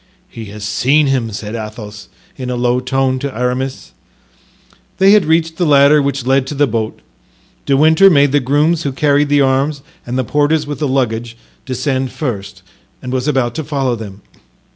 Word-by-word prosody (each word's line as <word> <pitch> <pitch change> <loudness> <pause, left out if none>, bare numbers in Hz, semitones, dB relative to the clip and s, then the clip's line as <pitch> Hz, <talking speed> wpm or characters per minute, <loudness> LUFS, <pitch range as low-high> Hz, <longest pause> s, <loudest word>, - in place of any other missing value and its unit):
"He 115 -10 -9
has 105 +1 -9
seen 130 +8 +2
him," 130 -5 -1
said 105 +1 -6
Athos, 105 -2 -8 0.3
in 130 -2 -6
a 125 - -2
low 120 0 +1
tone, 130 0 -1
to 140 -3 -5
Aramis. 125 +2 -3 1.1
They 195 +1 +5
had 210 -4 +5
reached 160 0 +1
the 175 - +1
ladder 145 +1 +5
which 140 -2 -2
led 135 0 +2
to 145 - -5
the 145 +1 +3
boat. 110 -3 -3 0.7
De 135 -1 +3
Winter 160 +6 +6
made 145 -5 +4
the 145 - +3
grooms 150 +5 +1
who 140 -4 -3
carried 145 +1 +2
the 145 0 +3
arms 135 +2 0 0.2
and 120 +1 -4
the 130 - 0
porters 150 +4 +1
with 145 0 -6
the 150 - 0
luggage 120 -3 -2 0.3
descend 130 0 -2
first 120 -8 -5 0.4
and 125 - -6
was 130 +1 -2
about 130 -5 0
to 160 - -4
follow 135 -4 -1
them. 105 -3 -10
135 Hz, 185 wpm, -16 LUFS, 120-145 Hz, 1.1 s, Winter